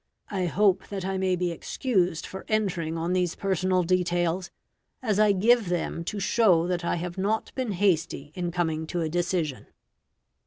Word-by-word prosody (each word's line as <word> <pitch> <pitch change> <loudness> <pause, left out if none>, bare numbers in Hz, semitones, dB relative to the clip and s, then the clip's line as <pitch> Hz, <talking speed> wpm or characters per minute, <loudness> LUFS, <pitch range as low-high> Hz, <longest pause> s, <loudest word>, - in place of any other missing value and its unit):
I 185 -3 0
hope 190 +1 +2
that 195 -2 -5
I 190 0 -1
may 185 -1 +2
be 180 -1 -1
excused 180 -2 -1
for 190 - -8
entering 180 -7 0
on 170 +2 -1
these 180 -2 0
personal 185 -1 +1
details, 175 0 0 0.5
as 215 -5 0
I 215 -1 +5
give 215 +1 +3
them 175 -1 -2
to 205 +3 -3
show 190 -4 +3
that 180 -1 -1
I - - 0
have 175 +2 -5
not 210 +3 -1
been 255 -6 -2
hasty 170 -6 0
in 175 0 -2
coming 160 -2 -1
to 175 +1 -2
a 160 - -1
decision." 170 -4 -1
180 Hz, 170 wpm, -27 LUFS, 170-195 Hz, 0.5 s, I